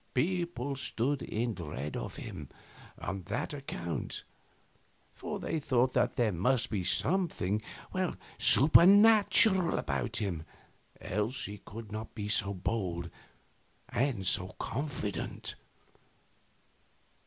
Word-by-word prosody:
People 160 -3 -1
stood 135 +1 -1
in 115 +1 -2
deep 90 -3 -7
dread 75 -1 -5
of - - -5
him - - -8 0.5
on 95 +1 -5
that 110 +7 -3
account; 110 - -5 0.9
for - - -5
they 160 - -2
thought 130 -3 +1
that 125 - +1
there 115 -3 +2
must 115 +8 0
be 100 -4 -1
something 110 - +1 0.8
supernatural 190 - +7
about 70 -3 -2
him, 95 -7 -2 0.6
else 110 +8 -2
he 105 0 -7
could 105 +1 -10
not 110 +1 -7
be 105 -2 -4
so 105 -1 +2
bold 90 -3 -3 0.8
and 120 -7 -1
so 90 0 +1
confident. 125 - -4
115 Hz, 110 wpm, -31 LUFS, 95-140 Hz, 0.9 s, supernatural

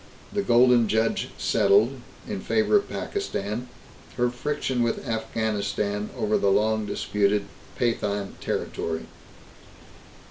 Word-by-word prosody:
The 205 - +1
Golden 120 - +5
Judge 110 - +1
settled 410 0 +3 0.3
in - - -4
favor 420 - +3
of 405 - -2
Pakistan 120 - -3 0.5
her 120 0 +2
friction 130 0 -2
with 120 +3 -1
Afghanistan 105 -2 -1
over 105 - +1
the 100 - +3
long 110 +1 +2
disputed 105 0 +1 0.3
Pathan 105 -4 -1
territory. 80 -1 -3
110 Hz, 105 wpm, -25 LUFS, 105-125 Hz, 0.5 s, Golden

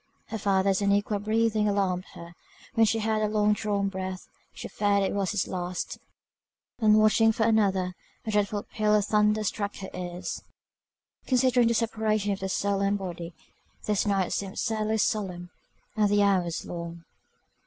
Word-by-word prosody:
Her 220 - -4
father's 195 0 +2
unequal 200 +1 +1
breathing 215 0 +1
alarmed 190 -2 0
her, 170 0 -10 0.4
when 225 -1 +4
she 225 - +1
heard 220 0 0
a 215 - +2
long 210 0 +2
drawn 205 -2 -1
breath, 190 -1 -5 0.2
she - - -8
feared 200 -1 +1
it 195 - -1
was 200 -2 0
his 205 - -1
last, 180 -1 -4 0.8
and 215 -2 +5
watching 215 +1 +5
for 220 0 -1
another, 195 -5 +2 0.3
a 220 - -2
dreadful 205 0 0
peal 215 -1 +1
of 205 -2 +2
thunder 210 0 +2
struck 205 0 -2
her 190 - -8
ears. 180 0 -5 0.9
Considering 255 -2 +3
the 235 - +2
separation 215 -2 0
of 195 - -2
the 190 - -3
soul 200 +1 0
and 200 +1 +1
body, 175 -3 -6 0.5
this 210 0 0
night 195 -3 +1
seemed 195 +1 -4
sadly 220 0 0
solemn, 185 -5 -1 0.4
and 210 -2 +3
the 205 0 +3
hours 185 -4 +1
long. 170 -1 -7
205 Hz, 165 wpm, -27 LUFS, 190-215 Hz, 0.9 s, and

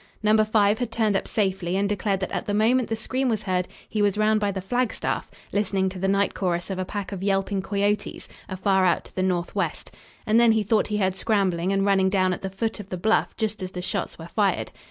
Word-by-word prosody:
Number 215 +1 +5
5 215 -1 +2
had 245 -2 -2
turned 220 -3 +1
up - - -1
safely, 190 -4 0
and 200 +1 +1
declared 200 -1 -1
that 190 - -3
at - - -3
the 205 - 0
moment 235 +3 +3
the 225 - 0
scream 255 +4 -1
was 220 -3 -1
heard 180 -2 0 0.2
he 215 - -2
was 205 -1 +2
round 215 0 +3
by 205 -1 0
the 195 - -4
flagstaff, 245 +6 -1 0.2
listening 200 -2 +1
to 185 0 -8
the 195 - 0
night 200 +1 +2
chorus 175 0 -2
of 190 - -3
a 185 - -1
pack 205 +1 -5
of 195 -2 -5
yelping 195 0 0
coyotes, 205 +1 -1 0.2
afar 190 0 +1
out 180 - +2
to - - -16
the 185 - -1
northwest, 180 -2 -1 0.3
and 220 +2 +4
then 235 -1 +6
he 220 -1 +1
thought 215 +1 +2
he 210 - -1
heard 190 -2 +1
scrambling 190 -4 0
and 195 0 +1
running 195 -1 +3
down 185 -1 +2
at - - -6
the 195 - -3
foot 220 +4 -3
of 200 -2 -9
the 185 - -4
bluff 220 +5 +1
just 215 -2 -2
as 185 - -3
the 180 -1 -6
shots - - -3
were - - -9
fired. - - 0
200 Hz, 240 wpm, -25 LUFS, 190-215 Hz, 0.3 s, then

